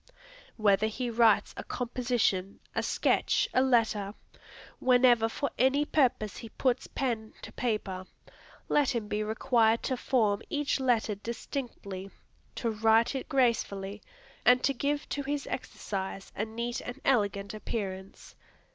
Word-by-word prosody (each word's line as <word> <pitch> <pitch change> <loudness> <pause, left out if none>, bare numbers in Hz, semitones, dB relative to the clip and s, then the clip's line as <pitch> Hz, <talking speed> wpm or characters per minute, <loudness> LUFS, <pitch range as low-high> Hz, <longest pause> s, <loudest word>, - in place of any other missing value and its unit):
Whether 215 -1 +3
he 240 +2 -3
writes 225 -2 +4
a - - -5
composition, 235 -6 -1
a - - 0
sketch, - - +1
a 255 - +4
letter, 220 -5 +2 0.6
whenever 245 -3 +5
for 280 +5 -2
any 270 +4 +3
purpose 250 -9 +1
he 230 - -8
puts 255 +2 0
pen 230 -5 -3
to - - -8
paper, 195 -6 -2 0.6
let 275 -3 +2
him 220 -3 -2
be 210 0 -1
required 225 +1 +2
to 260 - 0
form 220 -6 +1
each 290 -1 0
letter 240 -5 +2
distinctly, 205 -3 -6 0.5
to 230 - -1
write 225 +2 +3
it 265 +2 -5
gracefully, 210 -7 0 0.4
and 250 +2 +5
to 275 - +3
give 285 +3 -1
to 285 - -2
his 285 +1 -3
exercise 195 -5 -5
a 215 - -1
neat 235 +2 -4
and 245 +2 -7
elegant 200 -5 +1
appearance. 195 -3 -6
230 Hz, 135 wpm, -29 LUFS, 210-255 Hz, 0.6 s, whenever